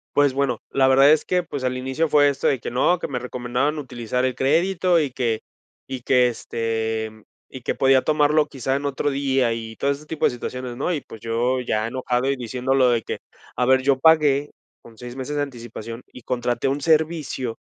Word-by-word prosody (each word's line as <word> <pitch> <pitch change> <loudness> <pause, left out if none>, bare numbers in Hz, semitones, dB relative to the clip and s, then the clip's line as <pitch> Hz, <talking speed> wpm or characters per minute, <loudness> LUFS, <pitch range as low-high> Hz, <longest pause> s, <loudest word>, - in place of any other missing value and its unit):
Pues 145 -2 +4
bueno, 135 -3 0
la 135 -1 +3
verdad 135 +2 +6
es 155 - +4
que, 180 -1 0
pues, 145 -5 -6
al 130 0 -1
inicio 130 +5 -1
fue 145 -1 +5
esto 140 - -1
de 135 - +2
que - - -6
no, 130 +9 +2
que - - -4
me 125 -3 -3
recomendaban 125 +4 -2
utilizar 125 -3 -2
el 130 - 0
crédito 175 +5 +2
y 145 -4 -1
que 120 -3 -1 0.5
y 130 -2 -5
que, 125 0 +4
este, 110 -1 -2
mm, 110 -1 -18 0.3
y 130 - -9
que - - -1
podía 135 0 +4
tomarlo 150 0 +3
quizá 135 -2 -2
en 140 +1 -3
otro 140 +1 -1
día 135 -3 +1
y 110 -1 -6
todo 140 - -1
ese 140 +2 -5
tipo 155 0 -1
de - - +5
situaciones, 125 0 -6
¿no?, 140 - -1
y, 150 - -2
pues, 115 - -12
yo 120 +3 0
ya 110 -2 -1
enojado 125 +1 -1
y 140 - +1
diciendo 125 +1 -2
lo 130 -2 +4
de 120 -1 +1
que, - - -4 0.4
a 125 - +1
ver, 130 +1 +4
yo 135 0 +2
pagué 145 -2 +4 0.3
con 115 -1 -16
6 125 0 -8
meses 135 +2 -4
de 145 - 0
anticipación 120 -3 -8
y 125 - -11
contraté 120 +1 -1
un 140 +2 0
servicio, 155 -6 0
130 Hz, 215 wpm, -22 LUFS, 120-145 Hz, 0.5 s, verdad